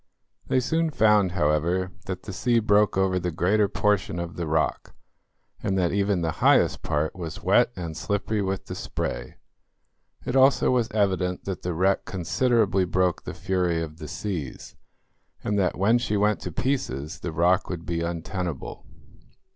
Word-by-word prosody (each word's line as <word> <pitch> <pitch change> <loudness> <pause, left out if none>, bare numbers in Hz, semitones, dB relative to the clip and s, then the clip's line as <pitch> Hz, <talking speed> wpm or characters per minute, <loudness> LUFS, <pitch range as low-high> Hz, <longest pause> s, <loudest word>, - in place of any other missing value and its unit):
They 130 - +2
soon 160 +6 0
found, 105 - +3
however, 85 +3 +1 0.2
that 95 -1 -5
the 100 - -7
sea 120 +5 +1
broke 105 -2 +3
over 95 -1 +2
the 90 - -2
greater 100 +6 +2
portion 100 -4 0
of 85 0 -5
the 85 -2 -3
rock, 75 -4 -1 0.7
and 95 - -1
that 90 -2 +1
even 100 -2 +1
the 80 - 0
highest - - +4
part 75 +1 -1
was 85 -2 -7
wet 110 +6 +4
and 85 -3 -5
slippery 105 +3 -1
with 95 -1 -2
the - - -6
spray. - - -4 0.9
It 125 - -2
also 135 0 +5
was 125 -3 +1
evident 95 -3 0
that 95 -2 -4
the 90 -2 -3
wreck 95 +3 +2
considerably 100 +1 +1
broke 90 0 0
the 90 - -6
fury 90 -2 0
of 80 -1 -5
the 75 - -7
seas, 90 -5 -5 0.7
and 105 -1 0
that 95 - +1
when 110 +6 +3
she 105 -3 -1
went 105 +1 +2
to 90 - -6
pieces 80 - -2
the 90 - -4
rock 85 +3 +2
would 85 -2 -5
be 85 -1 -2
untenable. 85 -2 -4
95 Hz, 165 wpm, -25 LUFS, 85-105 Hz, 0.9 s, also